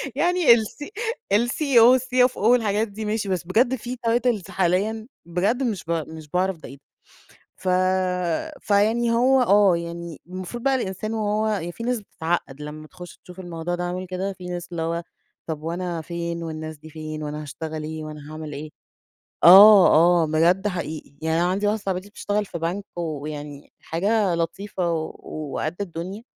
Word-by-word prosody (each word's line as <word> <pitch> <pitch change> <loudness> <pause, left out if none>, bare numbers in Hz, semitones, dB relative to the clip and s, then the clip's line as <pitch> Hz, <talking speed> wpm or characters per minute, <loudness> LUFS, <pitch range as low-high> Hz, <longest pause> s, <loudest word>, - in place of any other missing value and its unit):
يعني 355 +2 +1
ال 225 -2 +2 0.8
الCEO، 250 -2 +5
والCFO 250 0 +2
والحاجات 220 -1 +2
دي 215 +2 -7
ماشي، 210 -1 -2
بس 185 -3 -1
بجد 235 +8 +2
في 245 +1 -6
titles 230 -5 +1
حاليًا 200 +5 0 0.2
بجد 195 +10 0
مش 215 -7 -2
ب - - -2
مش 160 -2 -4
باعرف 185 +1 0
ده - - -11
إيه، 135 - -11 0.8
ف 185 - -4 0.9
فيعني 220 +4 +2
هو 255 +3 +4
آه، 200 -6 +5
يعني 170 -1 -7
المفروض 185 +6 -7
بقى 275 -1 +3
الإنسان 215 -2 -3
وهو 210 -4 -1
في 230 - -8
ناس 245 -1 0
بتتعقد 165 -7 -3
لمّا 155 +1 -8
تخش 180 0 -12
تشوف 180 +1 -12
الموضوع 175 -1 -4
ده 175 - -4
عامل 180 +1 -3
كده 185 +2 -3
في 180 -1 -12
ناس، 175 -1 -5
اللي 170 -1 -3
هو 170 +1 -2 0.4
طب 155 -2 -4
وأنا 170 0 -3
فين، 170 0 -4
والناس 155 -1 -6
دي 155 +2 -13
فين؟ 155 0 -6
وأنا 150 +1 -4
هاشتغل 155 +2 -6
إيه، 155 0 -5
وأنا 150 -1 -9
هاعمل 155 -1 -7
إيه؟ 150 +2 -7 0.7
آه، 195 +3 +10 0.4
آه، - - +2
بجد 170 +6 +2
حقيقي 160 -6 -5
يعني 160 +1 +1
أنا 175 - +2
عندي 200 +3 0
واحدة 210 0 0
صاحبتي 190 +1 -3
بتشتغل 205 0 -2
في 170 - -6
بنك 175 +5 -2
ويعني 150 -3 -6
حاجة 195 +2 +1
لطيفة 175 +1 -2
و 160 -1 -2
و 150 -3 -7
وقد 155 +2 -2
الدنيا. 185 +3 -5
180 Hz, 165 wpm, -23 LUFS, 160-215 Hz, 0.9 s, آه